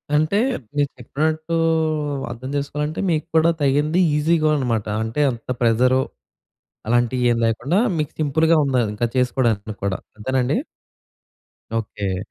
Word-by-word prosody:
అంటే, 155 Hz, +7 st, +2 dB, 0.4 s
మీరు 145 Hz, -1 st, +1 dB
చెప్పినట్టూ 155 Hz, +6 st, -2 dB, 0.8 s
అర్థం 130 Hz, +3 st, -7 dB
చేసుకోవాలంటే, 150 Hz, +2 st, -2 dB
మీకు 155 Hz, -1 st, 0 dB
కూడా 160 Hz, +1 st, +5 dB
తగింది 145 Hz, +5 st, +2 dB, 0.2 s
ఈజీగా 155 Hz, +1 st, +2 dB
అనమాట. 115 Hz, -6 st, -1 dB, 0.2 s
అంటే 115 Hz, +7 st, -2 dB
అంత 115 Hz, +1 st, -10 dB
ప్రెజరు, 125 Hz, +3 st, +3 dB, 0.9 s
అలాంటియేమి 120 Hz, 0 st, +2 dB
లేకుండా, 130 Hz, -, 0 dB, 0.2 s
మీకు 150 Hz, -, -2 dB
సింపుల్‌గా 160 Hz, +3 st, +3 dB
ఉండాలి 125 Hz, -5 st, +1 dB
ఇంకది 120 Hz, +3 st, -2 dB
చేసుకోడానికిని 115 Hz, -5 st, 0 dB
కూడా. 100 Hz, -2 st, -1 dB, 0.2 s
అంతేనాండి? 130 Hz, -, 0 dB, 1.2 s
ఓకే. 100 Hz, -4 st, -2 dB
130 Hz, 110 wpm, -21 LUFS, 115-155 Hz, 1.2 s, కూడా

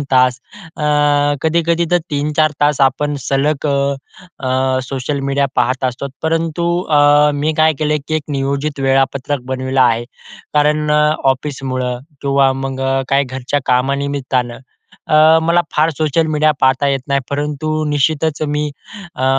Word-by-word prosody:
2 145 Hz, -, -3 dB
तास 125 Hz, -1 st, +3 dB, 0.4 s
अ, 150 Hz, -, -6 dB, 0.6 s
कधी-कधी 170 Hz, +1 st, +1 dB
तर 175 Hz, -, +4 dB
3-4 150 Hz, +2 st, +1 dB
तास 145 Hz, -1 st, +2 dB
आपण 145 Hz, +2 st, +1 dB
सलग 145 Hz, +2 st, 0 dB
अ 140 Hz, -, +1 dB, 0.7 s
अ 130 Hz, 0 st, +1 dB
सोशल 135 Hz, +2 st, -3 dB
मीडिया 140 Hz, 0 st, +1 dB
पाहत 130 Hz, +1 st, 0 dB
असतो. 130 Hz, +2 st, -2 dB, 0.2 s
परंतु 165 Hz, +1 st, -1 dB, 0.2 s
अ, 145 Hz, 0 st, +5 dB
मी 150 Hz, +2 st, 0 dB
काय 155 Hz, 0 st, +4 dB
केलयं 150 Hz, 0 st, 0 dB
की 155 Hz, -, -1 dB
एक 155 Hz, -, -3 dB
नियोजित 140 Hz, +1 st, -2 dB
वेळापत्रक 135 Hz, +1 st, 0 dB
बनविलं 130 Hz, 0 st, -1 dB
आहे. 120 Hz, -1 st, +3 dB, 0.5 s
कारण 150 Hz, +1 st, +2 dB
अ, 150 Hz, -, +3 dB, 0.3 s
ऑफिसमुळं 130 Hz, -2 st, -4 dB, 0.2 s
किंवा 140 Hz, -1 st, +2 dB
मग 135 Hz, 0 st, -5 dB, 0.3 s
काही 140 Hz, +1 st, +2 dB
घरच्या 130 Hz, +2 st, -3 dB
कामानिमित्तानं 130 Hz, -1 st, -1 dB, 0.5 s
अ, 155 Hz, +1 st, +5 dB
मला 170 Hz, +1 st, +3 dB
फार 155 Hz, +2 st, +3 dB
सोशल 155 Hz, +1 st, +1 dB
मीडिया 155 Hz, +1 st, +3 dB
पाहता 130 Hz, +1 st, +3 dB
येत 135 Hz, -1 st, 0 dB
नाही. 140 Hz, 0 st, +1 dB
परंतु 150 Hz, +2 st, -2 dB
निश्चितच 150 Hz, +2 st, 0 dB
मी 150 Hz, 0 st, -1 dB, 0.4 s
अ, 130 Hz, -, -3 dB
140 Hz, 140 wpm, -16 LUFS, 130-150 Hz, 0.7 s, अ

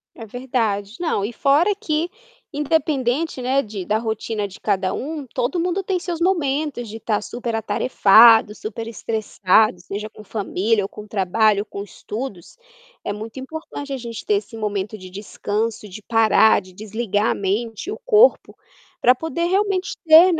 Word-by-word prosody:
É 225 Hz, -, -9 dB
verdade. 225 Hz, -3 st, -2 dB
Não, 320 Hz, -, 0 dB
e 210 Hz, -, -2 dB
fora 295 Hz, -, +3 dB
que 340 Hz, -5 st, -1 dB, 0.4 s
independente, 290 Hz, -1 st, 0 dB
né, 265 Hz, +2 st, +2 dB
de 205 Hz, -6 st, -7 dB
da 215 Hz, +1 st, +1 dB
rotina 220 Hz, -2 st, -3 dB
de 190 Hz, -, -13 dB
cada 190 Hz, -1 st, 0 dB
um, 295 Hz, +1 st, -4 dB
todo 250 Hz, +9 st, -2 dB
mundo 360 Hz, +3 st, -1 dB
tem 375 Hz, -1 st, -1 dB
seus 345 Hz, -2 st, -4 dB
momentos 295 Hz, -, 0 dB
de 220 Hz, -, -7 dB
estar 215 Hz, -2 st, -1 dB
super 235 Hz, +1 st, -5 dB
atarefado, 225 Hz, -1 st, +5 dB
super 225 Hz, +2 st, -6 dB
estressado, 215 Hz, -3 st, +1 dB
seja 205 Hz, +4 st, -6 dB
com 215 Hz, -, -14 dB
família 210 Hz, +1 st, 0 dB
ou 195 Hz, -, -4 dB
com 210 Hz, -, -10 dB
trabalho, 205 Hz, +1 st, +2 dB
com 200 Hz, -1 st, -7 dB
estudos, 205 Hz, -, -7 dB, 0.5 s
é 205 Hz, -, -1 dB
muito 220 Hz, +4 st, -7 dB
importante 285 Hz, 0 st, -7 dB
a -, -, -2 dB
gente 235 Hz, -2 st, -7 dB
ter 210 Hz, -, +2 dB
esse 205 Hz, +3 st, -4 dB
momento 210 Hz, -1 st, -3 dB
de 185 Hz, -2 st, -11 dB
descanso, 210 Hz, +2 st, -3 dB
de 205 Hz, +2 st, -10 dB
parar, 220 Hz, 0 st, +4 dB
de 185 Hz, -1 st, -15 dB
desligar 215 Hz, +1 st, -1 dB
a -, -, +1 dB
mente, 215 Hz, -, -2 dB
o 435 Hz, -, -6 dB
corpo, -, -, +4 dB, 0.4 s
para 250 Hz, -, +6 dB
poder 320 Hz, +5 st, -3 dB
realmente 385 Hz, 0 st, 0 dB
ter, 320 Hz, -1 st, +9 dB
né, -, -, +6 dB
225 Hz, 165 wpm, -21 LUFS, 210-285 Hz, 0.5 s, ter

